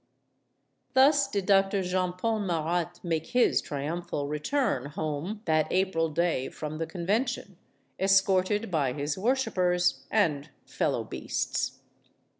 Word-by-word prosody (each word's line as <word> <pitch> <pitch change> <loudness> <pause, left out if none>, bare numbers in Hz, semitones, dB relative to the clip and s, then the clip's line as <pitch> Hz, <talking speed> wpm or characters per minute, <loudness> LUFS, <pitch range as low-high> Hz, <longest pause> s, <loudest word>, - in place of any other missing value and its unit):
Thus 275 +1 +5
did 200 -7 -2
Doctor 195 0 +3
Jean 180 0 0
Paul 220 +4 -1
Marat 170 -3 -1
make 165 -2 -1
his 245 - +4
trium 150 +5 -3
phal 145 -4 -4
return 150 - -1
home 155 +8 -4
that 155 -1 +1
April 185 -4 +1
day 160 -4 0
from 155 0 -6
the 165 - -2
Convention, 200 +5 -2 0.4
escorted 195 +2 +2
by 140 -6 +1
his 145 +1 -2
worshipers 185 -6 +1
and 160 -9 +1 0.2
fellow - - -1
beasts. - - -3
180 Hz, 120 wpm, -28 LUFS, 155-200 Hz, 0.4 s, Thus